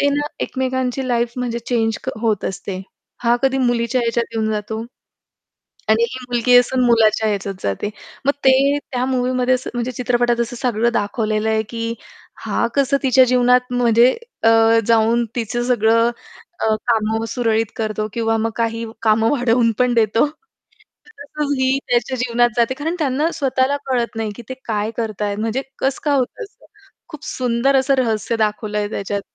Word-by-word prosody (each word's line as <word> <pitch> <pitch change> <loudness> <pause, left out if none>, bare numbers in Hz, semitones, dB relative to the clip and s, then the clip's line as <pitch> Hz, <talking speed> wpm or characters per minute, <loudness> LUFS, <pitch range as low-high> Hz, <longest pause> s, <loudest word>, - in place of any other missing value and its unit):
ते 285 - +3
ना 290 +1 0 0.2
एकमेकांची 260 0 -2
लाईफ 235 -1 0
म्हणजे 240 -2 -2
चेंज 225 -2 -1
क - - -4
होत 220 -4 0
असते. 190 0 -5 0.4
हा 235 0 +4
कधी 270 0 +2
मुलीच्या 240 0 +1
ह्याच्यात 235 0 0
येऊन 220 -1 0
जातो. 215 +1 -3 1.1
आणि 220 +1 +4
ही 255 - -6
मुलगी 245 +1 +4
असून 250 +1 +2
मुलाच्या 220 -2 +3
ह्याच्यात 200 -1 -2
जाते. 100 - -2 0.4
मग 280 - +4
ते 275 +2 +4
त्या 250 0 0
मूव्हीमध्ये 255 0 +1
असं 255 - -4
म्हणजे 240 +1 -2
चित्रपटात 240 0 0
असं 235 +1 -2
सगळं 235 -1 0
दाखवलेलं 215 +1 -1
आहे, 220 0 +1
की 230 +1 -4 0.5
हा - - +1
कसं 275 0 +2
तिच्या 260 -1 +5
जीवनात 250 0 +3
म्हणजे 240 0 +4 0.3
अ, 225 - +6 0.4
जाऊन 230 +1 +3
तिचं 240 +1 -2
सगळं 230 -1 +3 0.5
अ, 220 0 +2
कामं 220 -1 +1
सुरळीत 225 -3 0
करतो 215 -1 -2
किंवा 225 -1 0
मग 225 +1 0
काही 230 0 -1 0.2
कामं 225 0 +3
वाढवून 240 -3 +2
पण 250 -1 +2
देतो. 225 +3 +3 0.9
तसंच 290 0 -3
ही 260 +1 +2
त्याच्या 245 +1 +1
जीवनात 240 0 +2
जाते. 235 +2 +2
कारण 310 +5 -3
त्यांना 295 +2 +1
स्वतःला 270 0 +1
कळत 240 -3 -1
नाही, 220 -1 -2
की - - -9
ते 260 - -4
काय 215 -1 -1
करत 220 -3 -3
आहेत? 205 -1 -1
म्हणजे 225 +5 -1 0.2
कसं 270 0 0
काय 290 -2 +2
होतं 260 - -3
असं? 410 - -19 0.4
खूप 305 -3 -10
सुंदर 255 -1 +1
असं 270 +1 +3
रहस्य 230 -3 0
दाखवलं 210 -1 -1
आहे 205 0 -1
त्याच्यात. 200 -1 -3
235 Hz, 165 wpm, -19 LUFS, 225-255 Hz, 1.1 s, अ